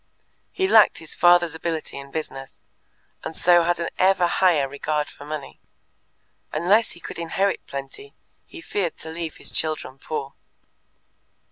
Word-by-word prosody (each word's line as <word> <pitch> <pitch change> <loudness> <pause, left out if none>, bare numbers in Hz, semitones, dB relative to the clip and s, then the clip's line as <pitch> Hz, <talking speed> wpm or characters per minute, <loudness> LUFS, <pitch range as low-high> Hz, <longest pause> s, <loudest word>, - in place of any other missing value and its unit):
He 380 - 0
lacked 220 - +6
his 160 - -7
father's 175 -2 +5
ability 160 -1 -4
in 140 0 -10
business, 135 -3 -6 0.6
and 160 - -6
so 175 -1 +5
had 175 0 +1
an 170 - -2
ever 185 -1 +4
higher 175 -5 +3
regard 150 +2 -2
for 145 - -12
money; 150 -2 -6 0.9
unless 195 +8 +3
he - - -13
could 170 - -8
inherit 190 +4 -1
plenty, 140 - -8 0.3
he 340 - -11
feared 195 - -2
to 160 - -8
leave 165 -1 -5
his - - -6
children 155 -4 -3
poor. 140 -3 -5
165 Hz, 145 wpm, -24 LUFS, 150-180 Hz, 0.9 s, lacked